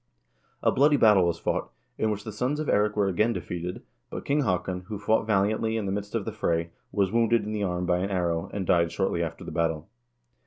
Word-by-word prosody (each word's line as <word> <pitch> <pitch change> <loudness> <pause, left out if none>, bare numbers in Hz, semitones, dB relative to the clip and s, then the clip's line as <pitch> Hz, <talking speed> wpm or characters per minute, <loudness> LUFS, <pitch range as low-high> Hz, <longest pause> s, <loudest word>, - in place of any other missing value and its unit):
A - - +4
bloody 145 +2 +4
battle 105 -7 +5
was 85 -1 0
fought, - - -2 0.3
in 110 - +2
which 105 -1 -3
the 110 - -6
sons 125 +8 -1
of 155 - -3
Eirik 105 +1 +2
were 100 -2 +2
again 105 +5 +2
defeated, 90 -1 -5 0.3
but - - -6
King 145 +1 +2
Haakon, 90 -4 -1
who 105 -1 -4
fought 110 +2 +1
valiantly 110 +2 +1
in 110 - -2
the 95 - -1
midst 100 +2 -4
of 110 -4 -1
the - - -3
fray, 85 0 -1 0.2
was 95 -1 +1
wounded 115 -1 +3
in 105 - -4
the 105 -1 -2
arm 90 -2 -1
by 90 0 +2
an 95 +2 -1
arrow, 85 -3 -1
and 100 -2 -3
died 85 -1 +3
shortly 95 -3 0
after 80 -2 -4
the - - -7
battle. 80 -2 -1
100 Hz, 230 wpm, -27 LUFS, 90-110 Hz, 0.3 s, battle